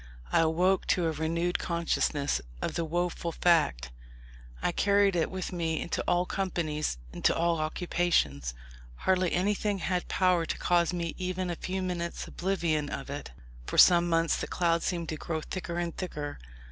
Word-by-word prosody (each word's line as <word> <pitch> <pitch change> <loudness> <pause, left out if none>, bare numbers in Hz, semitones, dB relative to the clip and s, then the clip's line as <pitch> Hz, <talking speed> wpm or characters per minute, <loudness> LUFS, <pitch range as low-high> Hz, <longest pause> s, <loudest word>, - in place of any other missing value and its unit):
I - - +4
awoke 175 +4 +2
to 180 - +2
a 165 - +1
renewed 165 +3 -1
consciousness 165 -4 0 0.2
of - - -2
the 170 - -1
woful 170 +1 -2
fact. 150 - +2 0.7
I - - 0
carried 200 +1 +3
it 165 -2 +1
with 185 0 -4
me 165 -2 -1
into 170 - -2
all 175 +1 +2
companies, 165 - -2 0.2
into - - +2
all 170 0 +1
occupations. 155 - 0 0.4
Hardly 185 - +1
anything 205 +2 +1
had 180 0 -1
power 180 -3 +2
to - - -2
cause 175 -1 +2
me 170 -2 -2
even 185 0 -2
a - - -3
few 190 +2 -3
minutes' 175 -2 -3
oblivion 170 -5 -1
of 140 0 -5
it. 145 +1 -5 0.4
For - - -3
some 175 -1 +7
months 165 0 +2
the - - -3
cloud 170 -1 +1
seemed 170 -2 -2
to 155 - -3
grow 160 +1 -3
thicker 170 +1 -5
and 170 -1 -2
thicker. 150 -6 -5
170 Hz, 165 wpm, -29 LUFS, 160-180 Hz, 0.7 s, some